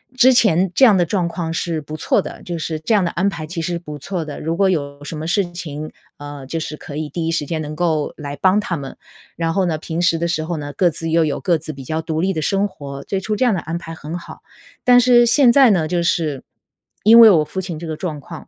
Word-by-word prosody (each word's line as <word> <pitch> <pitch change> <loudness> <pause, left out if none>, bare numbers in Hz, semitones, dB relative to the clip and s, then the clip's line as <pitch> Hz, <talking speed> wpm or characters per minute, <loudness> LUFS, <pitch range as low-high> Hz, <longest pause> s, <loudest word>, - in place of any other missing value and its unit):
之 255 +1 +6
前 190 -7 +3
这 270 - +6
样 215 -5 +6
的 175 - +3
状 175 -1 -1
况 170 -1 -4
是 165 -1 -2
不 155 +2 -8
错 - - +1
的， - - -9
就 175 -1 -4
是 155 0 -4
这 190 +8 -1
样 200 -3 +3
的 170 - -1
安 190 +3 0
排 165 -5 -3
其 165 +1 -5
实 175 +2 -2
是 170 - -2
不 150 -3 -9
错 180 +2 -4
的。 150 - -7
如 165 +2 -2
果 195 +1 +3
有 145 -4 -3
什 155 +2 -6
么 160 +1 -5
事 180 0 0
情， 155 -3 -7 0.2
呃， 145 -2 -9
就 165 +3 -3
是 155 -1 -5
可 145 - -9
以 155 -1 -4
第 165 -2 -3
一 - - 0
时 155 -3 -1
间 160 +1 -3
能 150 0 -6
够 155 -3 0
来 145 -2 -6
帮 190 +2 +3
他 170 -5 -3
们。 135 -1 -8 0.4
然 165 0 -1
后 195 -2 +1
呢， 160 -3 -1
平 165 +2 -4
时 170 -2 +2
的 170 - -2
时 160 -2 -1
候 170 0 -3
呢， 145 -1 -5
各 175 +3 +2
自 165 +1 -5
又 165 0 +3
有 150 - -2
各 175 -4 +2
自 155 0 -8
比 135 -1 -10
较 160 +4 -3
独 160 0 -2
立 190 +1 +1
的 160 - -2
生 195 +5 0
活。 140 -6 -9
最 195 - -2
初 210 +3 -2
这 255 - 0
样 245 - +3
的 185 - -1
安 165 +1 -4
排 165 -1 -8
很 160 +2 -6
好。 170 - -11 0.5
但 245 0 +7
是 240 -1 +5
现 245 +1 +5
在 265 -3 +6
呢， 160 -5 +1
就 175 -1 0
是 160 -5 0 0.6
因 225 +3 +8
为 225 -2 +10
我 160 -6 +4
父 190 - -6
亲 180 -4 -5
这 170 - -7
个 160 -1 -5
状 160 -4 -4
况。 - - -10
165 Hz, 300 characters per minute, -19 LUFS, 155-185 Hz, 0.6 s, 为